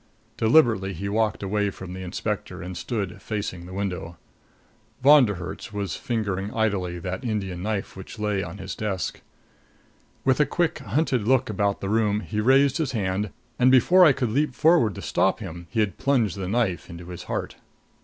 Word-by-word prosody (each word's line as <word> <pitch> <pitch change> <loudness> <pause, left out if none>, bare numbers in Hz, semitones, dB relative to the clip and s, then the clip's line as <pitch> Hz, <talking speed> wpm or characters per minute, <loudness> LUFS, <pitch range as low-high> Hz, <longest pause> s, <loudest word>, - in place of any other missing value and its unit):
Deliberately 110 -6 +3
he 100 +4 -5
walked 110 0 0
away 105 +1 0
from 95 -2 -8
the 95 - -7
inspector, 90 -1 -4
and 90 +1 -6
stood 105 0 -4
facing 100 -5 -4
the - - -10
window. 90 -4 -4 0.9
Von 145 -1 +8
der 100 - -2
Herts 90 +2 -7
was 100 -5 -3
fingering 105 -4 -2
idly 100 -6 0
that 90 +2 -5
Indian 100 -6 -3
knife 105 0 -3
which 95 +4 -9
lay 105 -2 0
on 90 +1 -6
his 95 -1 -6
desk. 100 -5 -3 1.0
With 130 0 +3
a 150 - +4
quick 170 +2 0
hunted 125 -2 0
look 130 -2 +3
about 100 0 0
the 95 - -3
room, 105 -1 +2
he 105 -1 -3
raised 135 +3 +4
his 140 -5 -1
hand; 100 -1 -1 0.3
and 125 +1 +6
before 175 +9 +6
I 160 - +8
could 125 -4 -1
leap 140 +1 0
forward 155 - +4
to - - -7
stop - - +1
him 85 +1 -8
he 115 - 0
had 100 -2 -2
plunged 130 -8 +2
the 95 -2 -4
knife 100 -4 0
into 85 0 -9
his 90 -2 -8
heart. - - -3
105 Hz, 185 wpm, -25 LUFS, 95-120 Hz, 1.0 s, Von